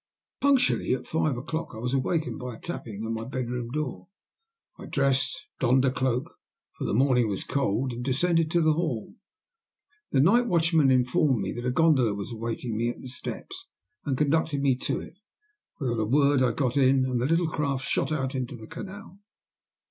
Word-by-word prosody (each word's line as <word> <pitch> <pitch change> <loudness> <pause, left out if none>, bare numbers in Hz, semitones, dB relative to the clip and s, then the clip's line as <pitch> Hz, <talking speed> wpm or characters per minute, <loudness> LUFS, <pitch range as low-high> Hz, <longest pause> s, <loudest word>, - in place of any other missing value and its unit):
Punctually 265 - +3
at 125 - -8
five 155 -4 0
o'clock 160 +6 -4
I - - -8
was 125 +3 -3
awakened 155 +4 0
by 125 -2 -6
a - - -14
tapping 110 -10 -6
at 110 - -3
my 115 0 -3
bedroom 125 -1 -4
door. 130 -9 -4 0.7
I - - -8
dressed, 135 -1 0
donned 130 +1 +3
a 130 - +3
cloak, 130 -1 -1 0.4
for - - -4
the - - -1
morning 125 -2 +3
was 95 -2 -2
cold, 130 -1 -1
and 120 +1 -5
descended 165 +5 +2
to 170 +1 +2
the 155 -1 +4
hall. 155 -9 -2 1.0
The 135 - +3
night 230 - +4
watchman 165 -6 +3
informed 125 -1 +2
me - - -2
that 120 +1 -4
a - - +2
gondola 130 -7 +3
was 100 +2 -5
awaiting 115 0 -4
me 115 +2 0
at 120 - -6
the 130 - -8
steps, 380 - -7 0.4
and 135 -3 -1
conducted 150 -1 +1
me 135 -2 +4
to - - -2
it. 180 - -12 0.6
Without 120 -5 -1
a - - +1
word 140 +3 +3
I 125 -2 +3
got 130 +1 0
in, 130 -1 +4
and 125 -2 -1
the 125 - +1
little 165 +2 +2
craft 140 -4 -1
shot - - 0
out 135 -3 -1
into 130 -1 -3
the 110 -2 -10
canal. 195 - -9
130 Hz, 190 wpm, -27 LUFS, 120-155 Hz, 1.0 s, the